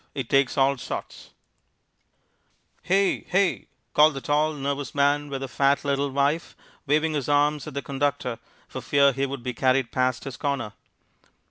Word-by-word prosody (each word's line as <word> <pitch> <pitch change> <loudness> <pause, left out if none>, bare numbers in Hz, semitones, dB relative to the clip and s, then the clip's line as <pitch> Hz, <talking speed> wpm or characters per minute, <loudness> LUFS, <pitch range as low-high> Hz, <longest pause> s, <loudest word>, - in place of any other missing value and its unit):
It 130 -4 -4
Takes 135 -2 +2
All 135 -1 +3
Sorts 125 - -7 1.5
"Hey, 195 +2 +2
hey," 195 0 0 0.3
called 150 0 +5
the - - -3
tall, 150 +3 +1
nervous 140 0 -4
man 145 +1 +2
with 135 -1 -4
the 135 - -3
fat, 140 +2 +1
little 140 0 0
wife, 140 +4 0 0.3
waving 155 +2 +2
his 145 -2 -2
arms 145 0 +2
at - - -8
the 140 - -3
conductor 135 -3 -2 0.3
for - - -7
fear 140 -1 +4
he 135 +2 -1
would 135 -2 -6
be 125 - -3
carried 130 0 +1
past 130 -1 0
his 135 -4 -7
corner. 140 -7 -2
140 Hz, 160 wpm, -25 LUFS, 135-145 Hz, 1.5 s, called